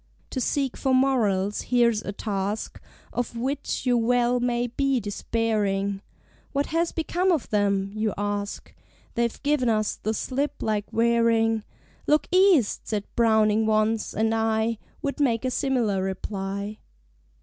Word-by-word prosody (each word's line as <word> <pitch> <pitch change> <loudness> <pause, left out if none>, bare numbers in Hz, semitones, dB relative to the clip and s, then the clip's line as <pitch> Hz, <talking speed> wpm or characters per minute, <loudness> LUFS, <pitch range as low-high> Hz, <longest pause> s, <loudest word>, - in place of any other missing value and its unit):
To 260 - -2
seek 275 0 -1
for 265 -2 +2
Morals 210 -7 +2
here's 235 -3 +2
a 200 - -4
task 205 0 -3 0.3
Of 240 -1 -3
which 270 +4 -2
you 250 -1 +3
well 245 +1 +2
may 240 0 0
be 270 +2 0
despairing; 205 -2 -1 0.5
"What 280 0 +1
has 335 +1 +1
become 355 +3 0
of 320 -7 0
them?" 200 -2 +1
you 215 0 0
ask, 205 0 -3 0.4
They've 235 -1 -1
given 285 -4 +2
us 215 -1 0
the 220 +1 -2
slip 275 +6 -2
like 210 -2 -1
Waring. 230 -1 +2 0.4
"Look 300 +1 +3
East!" 370 - +4
said 210 -2 -1
Browning 220 -1 +3
once, 215 0 +1
and 220 +1 +1
I 225 0 0 0.2
Would 280 0 -2
make 250 -4 +1
a 255 - 0
similar 245 -9 0
reply. 195 +2 -4
225 Hz, 140 wpm, -25 LUFS, 210-255 Hz, 0.5 s, East